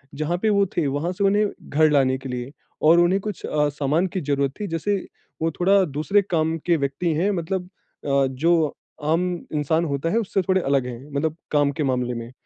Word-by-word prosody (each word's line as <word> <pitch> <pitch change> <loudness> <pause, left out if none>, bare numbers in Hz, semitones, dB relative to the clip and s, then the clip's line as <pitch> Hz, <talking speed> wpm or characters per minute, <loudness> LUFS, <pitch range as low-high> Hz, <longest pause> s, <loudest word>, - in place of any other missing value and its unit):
जहाँ 155 +4 -1
पे 220 - +2
वो 200 -1 +3
थे, 170 - +2
वहाँ 145 +6 -1
से 200 - -2
उन्हें 205 +2 +3 0.2
घर 155 +2 +4
लाने 135 -2 +3
के 135 0 -8
लिए, 125 +1 -5 0.3
और 165 +3 +6
उन्हें 175 +3 +3
कुछ 210 +1 -5
अ, 150 -1 +1
सामान 145 +5 0
की 185 - 0
ज़रूरत 140 -2 0
थी, 210 - -3
जैसे 165 +4 -1 0.5
वो 165 0 +1
थोड़ा 195 +4 +3
दूसरे 155 +7 +1
काम 165 -4 0
के 170 -2 +3
व्यक्ति 140 +4 -1
हैं, 175 +6 +1
मतलब 180 +1 -2 0.4
अ, 140 -1 +2
जो 155 +3 +1 0.3
आम 160 +4 +2 0.3
इंसान 160 +3 +1
होता 140 +1 -1
है 215 - +1
उससे 195 -3 0
थोड़े 185 0 +1
अलग 135 -4 +1
हैं, 125 +4 -8
मतलब 150 +2 -1 0.2
काम 145 -1 +3
के 150 +2 -3
मामले 125 -2 0
में। 115 0 -6
155 Hz, 205 wpm, -23 LUFS, 140-180 Hz, 0.5 s, और